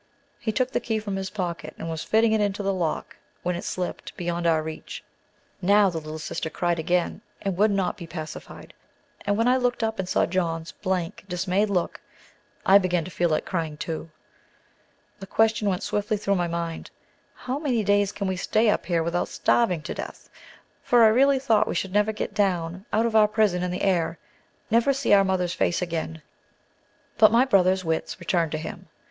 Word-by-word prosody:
He 220 - -1
took 255 +3 0
the - - +1
key 225 -2 -2
from 210 -2 -4
his 190 0 -3
pocket 170 -6 -4
and - - -6
was 160 -1 -4
fitting 220 +1 +3
it 220 -1 +2
into 205 0 -1
the 195 0 +1
lock, 170 -4 -3 0.3
when 180 0 0
it 175 - -5
slipped, 180 -1 -5
beyond 175 -1 -1
our 160 -2 +3
reach. 160 0 -7 0.6
Now 200 +1 +4
the 165 - -3
little 155 0 -7
sister 160 +1 -4
cried 175 0 -1
again, 175 +4 0 0.2
and 195 -2 -1
would 210 +4 +4
not 195 -1 0
be 170 -4 -8
pacified; 160 -2 -8 0.5
and 205 0 +2
when 230 +2 +2
I 255 +1 +4
looked 245 -2 0
up 220 -1 -1
and 185 -1 -2
caught - - +2
John's 165 -3 -1
blank, 185 -4 -3
dismayed 185 +4 0
look, 180 -4 -1 0.6
I 195 +1 +7
began 180 -3 0
to 185 - -8
feel 175 0 +1
like 155 - 0
crying, 160 -5 -3
too. 165 +1 -5 1.1
The 195 - -9
question 220 0 +2
went 180 -2 -2
swiftly 210 +1 -1
through 200 -1 0
my 175 -3 +1
mind, 170 -1 -4 0.5
How 255 +3 -4
many 255 -8 0
days 205 0 +2
can 200 - -4
we 190 -1 -1
stay 215 +4 +2
up - - -2
here 170 -2 +1
without 170 +2 -1
starving 180 -10 +1
to - - -4
death? - - -8 0.5
for 240 -1 +4
I 220 - +8
really 270 +5 +4
thought 225 -5 +2
we - - -2
should 190 -1 -2
never 210 +1 +3
get 215 - -4
down 185 -1 -1
out 220 +2 +2
of 230 -1 -1
our 215 -1 +7
prison 210 -4 +1
in 180 - -1
the 180 - -3
air: 170 -4 +1 0.5
never 235 +5 +4
see 270 -5 +1
our 200 -1 +7
mother's 185 -2 0
face 175 - +1
again. 165 -2 -4 1.0
But 215 -1 +7
my 235 +3 +5
brother's 185 -6 +3
wits 160 +3 -2
returned 170 -2 0
to - - 0
him. 155 - -7
190 Hz, 200 wpm, -25 LUFS, 170-215 Hz, 1.1 s, I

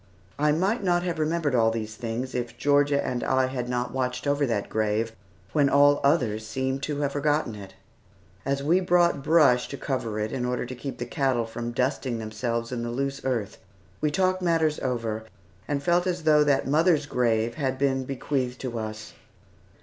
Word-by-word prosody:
I 150 0 +3
might 195 +9 +1
not 175 -2 +2
have 175 -3 -2
remembered 155 -2 0
all 115 -2 +4
these 110 -1 -4
things, 120 +3 -4
if 120 -1 -4
Georgia 145 +1 +2
and 125 -1 -2
I 130 0 +2
had 125 -2 -4
not 125 -1 -2
watched 130 0 -2
over 145 0 +1
that 105 -4 -1
grave, 110 +1 0 0.4
when 145 -2 +4
all 145 +1 +5
others 120 -7 +1
seemed 130 +3 -2
to 145 0 -2
have 140 -1 0
forgotten 145 -3 0
it. 100 -1 -10 0.7
As 140 +1 -1
we 170 +6 +4
brought 175 -5 +3
brush 140 -5 +4
to 140 - -6
cover 115 -7 -3
it, 105 +1 -2
in 130 -2 -2
order 125 0 -1
to 125 - -7
keep 135 +2 -6
the 120 - -4
cattle 125 -2 0
from 120 +1 -5
dusting 125 0 -1
themselves 115 +2 -3
in 120 -2 -3
the 120 - -3
loose 135 +3 -2
earth, 120 -6 -2 0.4
we 150 - +2
talked 185 +3 +1
matters 165 -3 +1
over, 115 -4 -2 0.4
and 140 -1 -2
felt 175 +3 +2
as 180 -2 -2
though 150 -1 +5
that 140 -3 +2
mother's 155 +1 +3
grave 115 -4 +1
had 135 -3 -2
been 135 -1 +1
bequeathed 130 -1 -2
to 120 -3 -3
us. 110 0 -6
130 Hz, 190 wpm, -26 LUFS, 120-150 Hz, 0.7 s, all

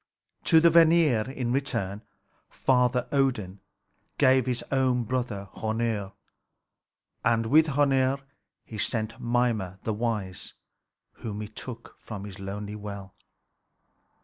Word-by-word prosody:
To 160 - +6
the 170 +1 +5
Vanir 160 -8 +5
in 130 -3 -3
return 115 -7 -1 0.5
Father 125 -1 +2
Odin 120 -9 0 0.6
gave 130 -1 +4
his 125 -1 -1
own 130 -2 +2
brother 115 -4 -3
Hœnir. 110 -3 -2 1.1
And 115 -1 +2
with 155 +7 +5
Hœnir 135 -2 +2 0.5
he 110 - -8
sent 110 +1 -2
Mimer 115 -6 0
the 110 - -1
wise, 105 -4 -3 0.6
whom 105 -2 -6
he 105 - -5
took 115 +2 -9
from 105 -3 -7
his 100 -2 -9
lonely 100 +2 -5
well. 100 -2 -8
115 Hz, 115 wpm, -27 LUFS, 105-130 Hz, 1.1 s, To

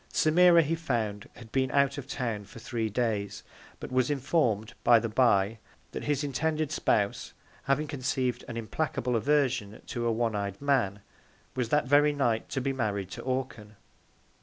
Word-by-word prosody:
Semira 170 +1 +5
he 155 +3 -1
found 115 -11 -2
had 115 -2 -13
been 130 -1 +1
out 140 +1 +2
of 135 - -9
Town 115 -6 -3
for 105 - -14
three 115 -1 -3
Days; 105 -3 -2 0.4
but - - -8
was 130 0 +2
inform'd, 125 -6 0
by 120 - +7
the 115 - 0
bye, 110 -2 +2 0.3
that - - -6
his 145 0 0
intended 155 +2 -1
Spouse, 100 -9 0 0.3
having 140 +3 +1
conceived 130 -3 -2
an 120 -2 -6
implacable 125 +1 -2
Aversion 130 -4 +1
to 120 -1 -3
a - - +2
one 115 -1 0
ey'd 100 -1 -3
Man, 125 -9 +1 0.5
was 125 -3 -1
that 150 0 +2
very 145 +2 +4
Night 120 -6 0
to - - -2
be 135 +1 -1
married 100 -7 -2
to - - -6
Orcan. 125 -5 -4
125 Hz, 165 wpm, -28 LUFS, 110-140 Hz, 0.5 s, by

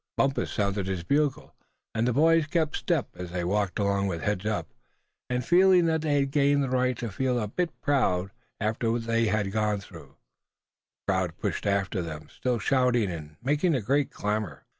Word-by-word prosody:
Bumpus 135 0 +1
sounded 100 -2 -1
his 95 -3 -2
bugle, 140 - 0 0.4
and 115 +2 +1
the - - +2
boys 160 +3 +4
kept 155 -1 0
step 165 -7 0
as 90 -1 -7
they 90 0 -3
walked 95 0 0
along, 100 -1 +1
with 85 -4 -3
heads 105 0 -1
up, 110 -1 -1 0.6
and 125 -1 -1
feeling 180 +1 +5
that 160 -1 +1
they 150 -2 +1
had 140 -1 -1
gained 140 0 +3
the 130 - -2
right 130 -1 +1
to 115 -3 -4
feel 125 +4 0
a 105 - -2
bit 175 - -3
proud, 100 -10 +1 0.3
after 115 +1 0
what 115 0 -2
they 115 0 +2
had 105 -1 0
gone 105 -1 0
through. 100 - -13 0.9
The - - +1
crowd 90 -4 -1
pushed - - -2
after 100 -1 0
them, 75 -2 -7
still 125 -2 0
shouting, 120 -2 +2
and 75 -2 -8
making 150 +5 +2
a - - +1
great 140 +6 +1
clamor. 105 - -3
115 Hz, 190 wpm, -27 LUFS, 100-140 Hz, 0.9 s, feeling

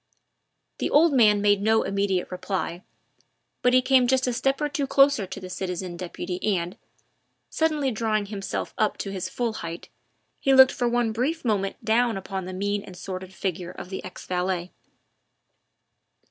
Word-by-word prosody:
The - - 0
old 310 +1 +5
man 210 -5 +5
made 205 -1 +4
no 220 +2 +3
immediate 195 -2 -1
reply, 180 -1 -3 0.8
but 250 - +4
he 255 0 +4
came 260 -1 +4
just 260 0 +2
a 250 - 0
step 270 +3 0
or 300 - 0
two 280 -1 -2
closer 275 -7 +4
to 190 +1 -7
the 185 - -8
citizen 180 -1 -4
deputy 180 +1 -5 0.2
and, 170 +1 -4 0.8
suddenly 305 -4 +1
drawing 215 -2 0
himself 200 -1 -4
up 215 -1 +1
to 195 - -4
his 185 -1 -4
full 235 +2 -2
height, 170 0 -7 0.5
he 270 -1 +3
looked 265 0 +9
for 245 -1 0
one 240 -1 +1
brief 265 +8 -2
moment 200 -4 -1
down 230 -1 +2
upon 190 -1 -5
the 185 - -6
mean 205 +2 -1
and 190 -3 -12
sordid 185 0 -6
figure 185 -2 -4
of 180 +1 -9
the 190 - -5
ex 185 - -9
valet. 180 -1 -2
205 Hz, 170 wpm, -25 LUFS, 185-250 Hz, 0.8 s, looked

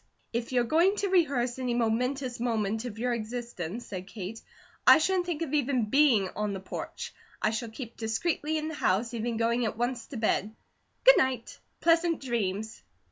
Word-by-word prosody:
"If 235 +1 -2
you're 245 -1 +3
going 335 - +3
to 405 -1 -1
rehearse 275 -9 +2
any 250 -2 -1
momentous 245 +2 0
moment 225 -1 -1
of 225 -3 -6
your 245 +2 0
existence," 235 -3 -5
said 185 -1 -6
Kate, 200 +2 -7 0.5
"I - - +10
shouldn't 360 +2 +1
think 335 -2 -1
of 305 - -5
even 260 -7 +1
being 265 -9 +5
on 210 0 -1
the 195 - -4
porch. 190 - -6 0.3
I 215 - +1
shall 225 +1 -3
keep 235 +1 -8
discreetly 300 +7 -1
in 310 0 -2
the 320 - -4
house, 230 -4 0
even 230 0 -2
going 235 +2 +1
at 215 - -3
once 240 0 -2
to 265 - -7
bed. 215 -1 0 0.5
Good - - +9
night! 260 -3 -1 0.2
Pleasant 335 -1 +3
dreams!" 220 -4 -2
240 Hz, 180 wpm, -29 LUFS, 220-280 Hz, 0.5 s, I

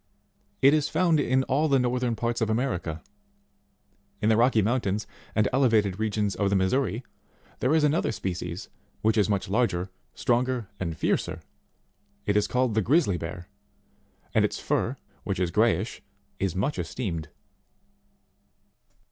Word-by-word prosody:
It 140 +2 +7
is 155 -2 +2
found 165 -1 +3
in 130 -1 +2
all 140 +4 +1
the 140 -2 +4
northern 125 -1 0
parts 120 +1 -2
of 110 - +1
America. 90 -9 -1 1.2
In 105 - +1
the 110 - +5
Rocky 115 -1 +4
Mountains 105 -2 0 0.3
and 105 -1 +3
elevated 110 -7 +3
regions 105 -2 0
of 100 +2 0
the 100 - +2
Missouri, 110 +4 +1 0.6
there 135 +5 +2
is 160 - +3
another 150 +3 +2
species 90 -2 -4 0.4
which 110 +1 +3
is 105 -1 +2
much 100 -2 0
larger, 95 -4 0 0.2
stronger, 125 -2 0
and 85 -4 -3
fiercer: - - 0 0.9
it 105 - +1
is 105 - +3
called 125 -2 +1
the 110 - +2
Grizzly 115 - +2
Bear, 85 +2 -6 0.9
and - - +4
its - - 0
fur - - -1 0.3
which - - -2
is 90 -2 0
greyish, - - +1 0.4
is 95 -3 -1
much 135 +11 -1
esteemed. 85 -10 -4
110 Hz, 145 wpm, -27 LUFS, 95-130 Hz, 1.2 s, It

